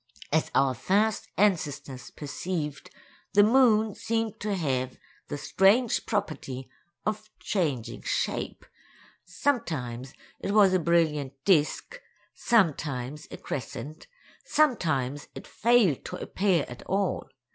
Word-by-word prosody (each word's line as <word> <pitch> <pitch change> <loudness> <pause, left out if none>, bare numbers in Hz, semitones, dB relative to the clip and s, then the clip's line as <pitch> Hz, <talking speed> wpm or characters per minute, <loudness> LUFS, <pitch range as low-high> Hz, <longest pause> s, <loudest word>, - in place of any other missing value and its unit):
As 160 +1 +2
our 135 -1 +4
first 205 - +1
ancestors 145 -10 0
perceived, 150 0 -5 0.4
the 205 - +7
moon 220 -2 +4
seemed 225 0 -2
to 210 -1 -1
have 130 -7 -1 0.3
the - - -4
strange 210 - +3
property 135 - -3 0.4
of 215 0 -3
changing 150 - -2
shape; - - -2 0.6
sometimes 155 - -2 0.2
it 200 - -2
was 200 -3 +6
a 185 - +4
brilliant 155 -5 +1
disk; 190 - +2 0.3
sometimes 150 - 0
a - - -8
crescent; 150 +3 -6 0.4
sometimes 155 - +1
it - - -8
failed 230 - +3
to - - -5
appear 185 -6 0
at 125 - -9
all. 195 -1 -1
175 Hz, 110 wpm, -27 LUFS, 140-210 Hz, 0.6 s, the